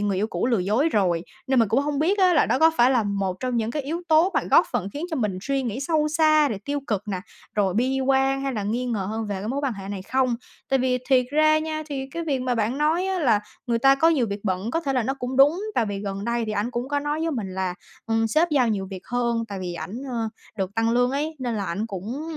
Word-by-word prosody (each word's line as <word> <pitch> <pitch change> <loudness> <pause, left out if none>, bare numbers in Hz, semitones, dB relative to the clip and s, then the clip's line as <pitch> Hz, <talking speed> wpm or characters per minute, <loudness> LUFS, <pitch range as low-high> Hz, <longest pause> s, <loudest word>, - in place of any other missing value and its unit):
người 205 -2 0
yêu 205 +3 +1
cũ 225 - -2
lừa 240 -3 +2
dối 215 - +2
rồi, 180 - +1 0.2
nên 265 -1 +2
mình 225 -3 +4
cũng 230 +6 +3
hông 290 0 -2
biết 360 +7 +2
á 370 -2 +5
là 305 - +4
đó - - +1
có 320 +2 +6
phải 240 +2 +5
là 250 -3 +3
một 200 -2 -2
trong 250 -2 -1
những 225 0 0
cái 295 +3 -3
yếu 325 +6 -4
tố 320 +4 +5
mà - - +3
góp - - +6
phần 190 - -1
khiến 295 +3 -4
cho 320 - -1
mình 210 -7 -1
suy 275 +3 -1
nghĩ 240 +1 -3
sâu 305 +1 +1
xa, 310 -1 +4
rồi 215 - -3
tiêu 285 0 -2
cực 210 -3 -1
nè, 190 -3 -2 0.4
rồi 195 -3 +2
bi 260 +4 +1
quan 270 0 +2
hay 275 -1 -1
là 215 -4 -3
nghi 235 +5 -1
ngờ 230 -4 -1
hơn 220 0 -3
về 205 - -3
cái 205 +3 -5
mối 270 +4 -1
quan 270 - 0
hệ 195 -2 -8
này 200 -2 -5
không. 255 +3 +1 0.3
Tại 270 - +2
vì 255 0 +1
thiệt 255 -2 +4
ra 310 +1 +4
nha, 310 0 -3
thì 270 -3 -4
cái 335 +3 -4
việc 285 -4 0
mà 255 -1 0
bạn 230 +4 -1
nói 320 +5 +2
á 380 -1 -1
là 235 -10 +3 0.3
người 235 -1 +1
ta 270 +3 +6
có 320 +4 +4
nhiều 285 -8 +2
việc 200 -1 -4
bận 190 +2 -1
có 330 - 0
thể 280 -5 -2
là 255 -2 +1
nó 265 +5 -1
cũng 255 -1 -4
đúng, 290 +7 +5
tại 230 - +2
vì 200 -1 -3
gần 200 0 -4
đây 235 0 0
thì 215 - -2
ảnh 210 +3 -1
cũng 245 +1 -3
có 290 0 0
nói 295 +2 -2
với 325 0 0
mình 210 -10 -4
là, 185 -1 -2 0.3
ừm, 225 0 +1
sếp 315 +10 +2
giao 265 -5 +3
nhiều 200 -3 -1
việc 190 -2 -7
hơn, 235 -2 0
tại 200 -1 -5
vì 180 -1 -4
ảnh, 195 +6 -6
ờ, 230 -2 -2 0.3
được 190 0 -3
tăng 225 0 +1
lương 245 +1 +2
ấy 300 +4 -2
nên 245 -3 -2
là 205 -2 -2
ảnh 195 +6 -2
cũng 220 +7 -5
245 Hz, 285 wpm, -24 LUFS, 210-285 Hz, 0.4 s, có